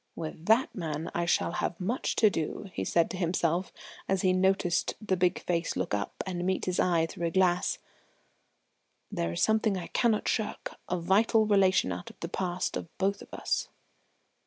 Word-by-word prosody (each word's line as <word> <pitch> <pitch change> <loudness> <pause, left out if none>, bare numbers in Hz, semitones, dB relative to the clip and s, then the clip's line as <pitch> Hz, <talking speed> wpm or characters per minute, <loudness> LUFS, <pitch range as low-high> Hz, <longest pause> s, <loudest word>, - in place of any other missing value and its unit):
"With 160 0 -7
that 225 +5 +4
man 160 -3 -4
I 170 0 -1
shall 170 - +2
have 170 - -2
much 220 +8 -1
to 215 -2 +5
do," 185 +4 -4
he - - -2
said 170 -1 +2
to 185 - -5
himself, 175 0 0 0.4
as 190 -1 +1
he 185 -1 +4
noted 185 -1 +1
the 210 -4 0
big 180 0 +1
face 170 -1 -1
look - - -2
up 100 -1 -2
and 180 -2 -3
meet 185 +1 0
his 180 -1 -1
eye 170 -3 +3
through 170 +1 -3
the 165 - -2
glass. 180 -1 +2 1.3
"There 85 0 -1
is - - 0
something 220 -2 +2
I 175 - -4
cannot 225 -3 +1
shirk 220 - -2 0.2
a 180 - 0
vital 215 +5 +3
relation 190 - +3
out 85 +1 -5
of - - -16
the 170 - -5
past 180 -1 -2
of - - -4
both 195 +1 0
of - - -13
us." - - -2
180 Hz, 185 wpm, -29 LUFS, 170-195 Hz, 1.3 s, to